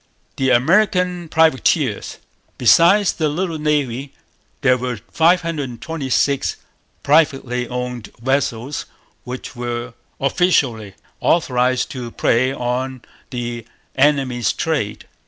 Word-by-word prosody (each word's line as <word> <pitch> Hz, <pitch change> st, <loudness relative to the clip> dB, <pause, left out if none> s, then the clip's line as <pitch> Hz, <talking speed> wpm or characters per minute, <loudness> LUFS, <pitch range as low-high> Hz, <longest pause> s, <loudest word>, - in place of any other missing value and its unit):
The 130 Hz, -1 st, +1 dB
American 180 Hz, -, +2 dB
Privateers. 155 Hz, -6 st, +1 dB, 0.4 s
Besides 175 Hz, -, +5 dB
the 155 Hz, -2 st, 0 dB
little 165 Hz, +1 st, -2 dB
Navy, 140 Hz, -3 st, -1 dB, 0.5 s
there 125 Hz, -, +4 dB
were 125 Hz, -1 st, -3 dB
526 155 Hz, -4 st, 0 dB, 0.5 s
privately 135 Hz, -5 st, +2 dB
owned 125 Hz, -2 st, -5 dB
vessels 130 Hz, +1 st, -1 dB, 0.4 s
which 125 Hz, +1 st, -7 dB
were 120 Hz, 0 st, -4 dB, 0.3 s
officially 135 Hz, -, +1 dB, 0.2 s
authorized 130 Hz, -5 st, +1 dB
to 125 Hz, -3 st, -6 dB
prey 120 Hz, +2 st, +1 dB
on 130 Hz, 0 st, -3 dB, 0.3 s
the 120 Hz, -2 st, -4 dB, 0.3 s
enemy's 130 Hz, -5 st, +2 dB
trade. 150 Hz, -11 st, -2 dB
130 Hz, 90 wpm, -19 LUFS, 125-160 Hz, 0.5 s, Besides